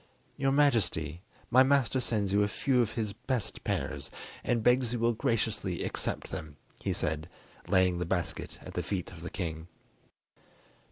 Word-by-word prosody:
"Your 135 0 +1
Majesty, 105 - +2 0.3
my 130 - +8
master 135 -1 +4
sends 105 -6 0
you 100 - +5
a 100 - +3
few 125 +5 +2
of 115 -2 0
his 105 -3 -2
best 125 0 -3
pears, - - -2 0.3
and 115 -2 +1
begs 125 0 +4
you - - 0
will 115 +1 +2
graciously 110 -6 0
accept - - -3
them," 75 -2 -6 0.2
he - - -1
said, 80 +2 -2 0.4
laying 90 -1 +3
the 90 - -1
basket 90 -2 -2
at - - -9
the 90 - -1
feet 90 +1 -3
of 85 -3 -11
the 85 - -5
king. 80 -3 -4
105 Hz, 165 wpm, -30 LUFS, 90-125 Hz, 0.4 s, my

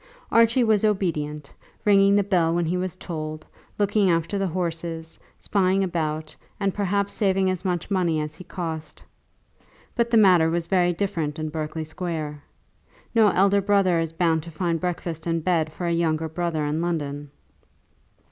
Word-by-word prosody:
Archie 230 +2 +4
was 220 -3 +2
obedient, 150 -8 -1 0.3
ringing 200 -1 +5
the 205 - +4
bell 175 -4 +2
when 175 -1 +1
he 170 +3 -1
was 185 0 -3
told, 155 -3 -6 0.3
looking 205 -1 +2
after 170 +3 0
the 195 - 0
horses, 165 -2 -4 0.2
spying 195 -1 +1
about, 155 -3 -3 0.2
and 195 -2 0
perhaps 200 0 0
saving 190 -2 +2
as 185 0 -4
much 180 0 -2
money 175 -5 +1
as 150 0 -4
he 185 - -11
cost. 160 -4 -6 0.9
But 235 0 +1
the 230 - +4
matter 180 -6 +6
was 170 0 -1
very 180 -1 +2
different 165 -5 -2
in 155 -1 -3
Berkeley 155 0 -4
Square. 155 -3 -5 0.7
No 225 -2 +5
elder 200 +1 +3
brother 195 -3 +3
is 165 -1 -2
bound 165 -1 +1
to 170 - -10
find 165 0 -1
breakfast 175 -2 -4
and 165 -1 0
bed 165 -3 +1
for 175 - -5
a 170 - 0
younger 160 -1 0
brother 160 -1 -2
in 150 +2 -1
London. 145 -4 -3
170 Hz, 165 wpm, -24 LUFS, 160-195 Hz, 0.9 s, matter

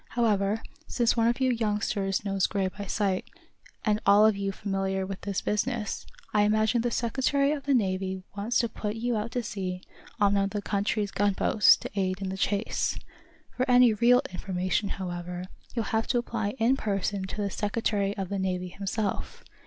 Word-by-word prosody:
However, 215 -2 +1 0.2
since 240 -2 +2
one 230 -1 +3
of 240 +2 +1
you 260 -1 +3
youngsters 210 -3 -1
knows 195 -1 +1
Gray 195 -2 0
by 200 +2 -8
sight, 195 -2 -1 0.6
and 210 -1 +3
you're 200 - +3
all 205 +1 +7
of 220 -1 +4
you 200 0 -2
familiar 195 -1 -2
with 190 0 -6
this 200 -2 -2
business, 210 0 -2 0.3
I 210 - +4
imagine 215 +3 +3
the 240 - 0
Secretary 265 +5 +1
of 285 -2 -3
the 280 - +4
Navy 190 -3 -1
wants 210 +4 0
to 235 - 0
put 210 -1 -4
you 235 +1 -1
out 215 +2 -2
to 245 - -1
sea 185 -4 -4 0.4
on 205 -1 +4
one 200 -1 +3
of - - -2
the 205 0 -3
country's 205 0 0
gunboats, 205 +1 +4
to - - -7
aid 190 -2 -1
in 195 -1 -3
the 190 - -3
chase. 200 +2 0 0.6
For 255 +1 -1
any 245 -2 +6
real 240 +4 +4
information, 185 +2 -1
however, 180 -1 -5 0.3
you'll 230 -3 0
have 220 0 +1
to - - +1
apply 230 -2 -2
in 245 +3 +3
person 200 -3 -1
to - - -7
the 200 -1 -1
Secretary 205 -1 -1
of 190 -2 -3
the 200 - -2
Navy 180 -1 -2
himself. 200 +2 -3
205 Hz, 190 wpm, -28 LUFS, 195-225 Hz, 0.6 s, all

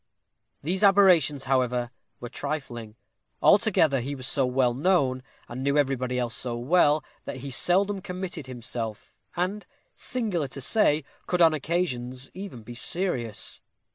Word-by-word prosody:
These 180 +5 +1
aberrations, 180 -8 +5
however, 125 -2 0 0.3
were 120 - -6
trifling; 120 -7 -5 0.4
altogether 185 - +4
he 140 +4 -4
was 130 -2 -6
so 135 -1 +2
well 125 -1 +2
known, 135 -3 +1 0.3
and 120 +2 -6
knew 140 +2 +1
everybody 130 -3 0
else 120 -2 -2
so 120 -2 -2
well, 150 +3 +3 0.2
that - - -5
he 140 - -5
seldom 195 +8 +2
committed 180 -5 -6
himself; 120 -3 -6 0.2
and, 190 +4 -2 0.3
singular 210 - -2
to 135 - -8
say, 155 - +2 0.2
could 180 - 0
on 165 -2 +6
occasions 135 -6 -2
even 185 - -8
be 120 +3 -9
serious. 125 - -1
140 Hz, 140 wpm, -26 LUFS, 125-180 Hz, 0.4 s, on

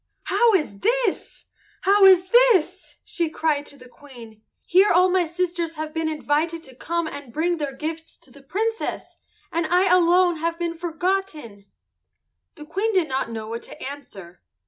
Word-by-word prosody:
"How 440 +2 +3
is 300 - -2
this? 480 - -1 0.4
How 400 +1 +5
is 375 -1 +5
this?" 400 -7 +3
she 335 -3 -2
cried 305 -2 -1
to 285 - -12
the 255 -1 -15
Queen. 240 -5 -15 0.2
"Here 380 +4 +4
all 365 +2 +4
my 365 -1 +2
sisters 340 -1 -3
have 310 0 -6
been 320 -1 -1
invited 315 +2 -1
to 260 -2 -14
come 340 +5 -3
and 285 -5 -8
bring 340 +6 0
their 285 -3 -4
gifts 320 +2 -6
to 260 - -20
the 280 - -16
Princess, 445 +10 -4 0.3
and 335 -1 -1
I 360 +2 +3
alone 355 0 +4
have 335 +1 -2
been 340 -1 -2
forgotten." 325 - -4 0.9
The 300 - -11
Queen 390 +8 -1
did 365 -5 +2
not 265 -2 -2
know 220 -1 -6
what 230 +1 -5
to - - -11
answer. 200 -11 -10
330 Hz, 170 wpm, -23 LUFS, 285-365 Hz, 0.9 s, How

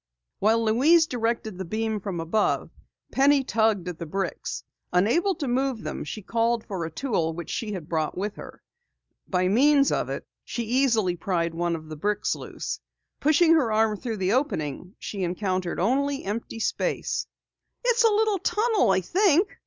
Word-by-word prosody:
While 225 +2 +3
Louise 295 +10 +5
directed 230 - -2
the - - -2
beam 220 +3 -2
from 190 -3 -4
above, 170 +6 0 0.4
Penny 275 0 +4
tugged 220 -7 +1
at 175 -2 -5
the 170 - -5
bricks. 190 +2 -3 0.3
Unable 245 - +2
to 295 -6 -4
move 255 -1 0
them, - - -4
she 215 - -6
called 230 +2 0
for 190 -4 -4
a - - -4
tool 170 - -1
which 170 0 -6
she 215 -2 -3
had 175 -6 -6
brought 160 -1 -1
with 205 +2 -2
her. - - -11 0.6
By 180 -1 +1
means 275 +7 +4
of - - 0
it, - - -4 0.2
she 235 - -4
easily 230 -6 +2
pried 170 -1 -1
one 170 0 0
of 155 -1 -8
the 155 - -7
bricks 205 +7 0
loose. - - -5 0.4
Pushing 315 +3 +5
her 275 -9 +3
arm 215 0 +2
through 225 +1 -4
the 190 +1 +1
opening, 180 - -2
she 200 - -6
encountered 185 0 -1
only 275 +8 +1
empty 225 +3 -4
space. - - -1 0.6
"It's 485 -1 +4
a 455 - +6
little 425 -2 +2
tunnel 435 - +2
I 190 0 +3
think!" 375 - +2
220 Hz, 170 wpm, -26 LUFS, 185-275 Hz, 0.6 s, a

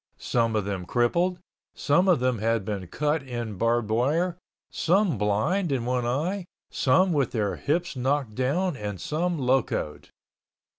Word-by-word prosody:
Some 115 -2 0
of 105 -2 0
them 95 -3 -4
crippled, 170 +10 +1 0.4
some 170 +6 +2
of 180 -7 +4
them 125 -2 0
had 115 -1 0
been 100 -4 -4
cut 150 - 0
in 120 -5 -5
barbed 115 -1 +1
wire, 155 +10 +1 0.4
some 185 -2 +2
blind 145 - +1
in 125 -4 -1
one 125 -1 0
eye, 170 +10 -1 0.3
some 175 +8 +3
with 140 -4 0
their 105 -4 -1
hips 170 +2 -1
knocked 130 -2 0
down 150 - 0
and 105 -5 -5
some 170 - -1
locoed. 130 - -1
130 Hz, 150 wpm, -26 LUFS, 115-165 Hz, 0.4 s, of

